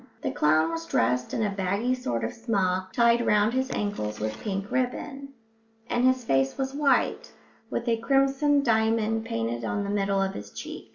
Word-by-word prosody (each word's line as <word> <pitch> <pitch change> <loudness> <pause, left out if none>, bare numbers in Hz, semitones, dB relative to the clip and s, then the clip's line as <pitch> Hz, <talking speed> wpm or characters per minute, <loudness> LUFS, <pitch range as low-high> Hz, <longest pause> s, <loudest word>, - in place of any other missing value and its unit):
The - - -1
clown 155 +2 +2
was 165 0 -5
dressed 125 +2 +1
in 225 - -1
a 205 - 0
baggy 200 +5 0
sort 120 - -2
of - - -2
smock, 190 -6 -1
tied 235 +2 +3
round 210 +1 +3
his 260 +1 0
ankles 205 - -3
with 110 0 -2
pink 195 0 -4
ribbon, 270 +2 -2 0.6
and 240 - +1
his 255 0 +3
face 135 -9 +1
was 270 0 -2
white, 285 -1 +1 0.4
with 235 - -3
a 230 -1 +2
crimson 275 +4 +2
diamond 225 -1 +1
painted 115 - -3
on 200 - -1
the 200 - -3
middle 200 -1 +1
of 195 0 -1
each 100 0 -9
cheek. - - -7
210 Hz, 180 wpm, -26 LUFS, 180-245 Hz, 0.6 s, tied